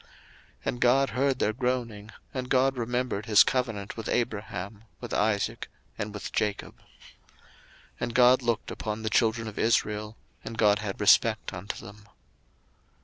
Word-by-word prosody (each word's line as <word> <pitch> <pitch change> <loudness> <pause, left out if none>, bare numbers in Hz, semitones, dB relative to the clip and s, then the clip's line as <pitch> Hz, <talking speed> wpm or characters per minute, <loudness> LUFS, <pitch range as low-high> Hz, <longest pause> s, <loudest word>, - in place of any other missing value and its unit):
02:002:024 - - -27 0.6
And 120 - -2
God 135 +3 +4
heard 135 0 +1
their 110 - +1
groaning, 120 -4 -2 0.2
and 125 -1 -4
God 135 +1 +3
remembered 120 -2 -2
his 105 -1 +7
covenant 115 -6 -2
with 115 - -6
Abraham, 105 -2 -3
with - - -7
Isaac, 105 -2 0 0.3
and 105 +1 -4
with 105 -1 -7
Jacob. 105 -1 -2
02:002:025 - - -27 1.1
And 120 -1 -3
God 125 +1 +6
looked 120 -2 -1
upon 110 0 -4
the 110 - -2
children 115 +1 +2
of 105 - -7
Israel, 105 -1 0 0.3
and 115 0 -7
God 105 -2 +4
had 105 -2 -5
respect 105 -2 +3
unto 95 +4 -6
them. 105 +1 -13
110 Hz, 150 wpm, -27 LUFS, 105-125 Hz, 1.1 s, his